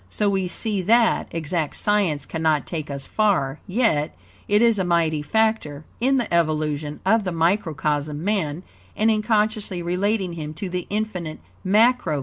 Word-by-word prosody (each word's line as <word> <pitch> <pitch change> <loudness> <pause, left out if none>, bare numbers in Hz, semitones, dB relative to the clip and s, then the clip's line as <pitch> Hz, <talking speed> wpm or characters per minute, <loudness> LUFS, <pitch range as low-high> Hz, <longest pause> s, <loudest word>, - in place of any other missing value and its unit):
So 205 - 0
we 190 -2 0
see 205 +2 -2
that, 230 +5 +3
exact 160 -1 -2
science 190 -9 +1
cannot 160 -3 0
take 155 -3 -5
us 140 -1 -4
far, 175 -10 +1
yet, 185 - 0 0.3
it 210 +2 +3
is 230 -3 +3
a - - +1
mighty 165 -3 +1
factor, 160 -5 0
in 265 +3 +2
the 240 -8 -2
evolution 155 -2 0
of 220 +3 +3
the 185 - -2
microcosm 155 -4 0
Man, 185 -5 -1 0.3
and 220 +1 +3
in 215 -1 +1
consciously 210 -4 0
relating 185 +1 0
him 155 -2 -6
to 190 +4 -5
the 180 -1 -3
Infinite 195 -7 -3 0.3
Macrocosm 220 +6 +5
God, - - -21
Spirit, 155 -4 -1
All. - - -1
180 Hz, 170 wpm, -23 LUFS, 155-215 Hz, 0.3 s, Macrocosm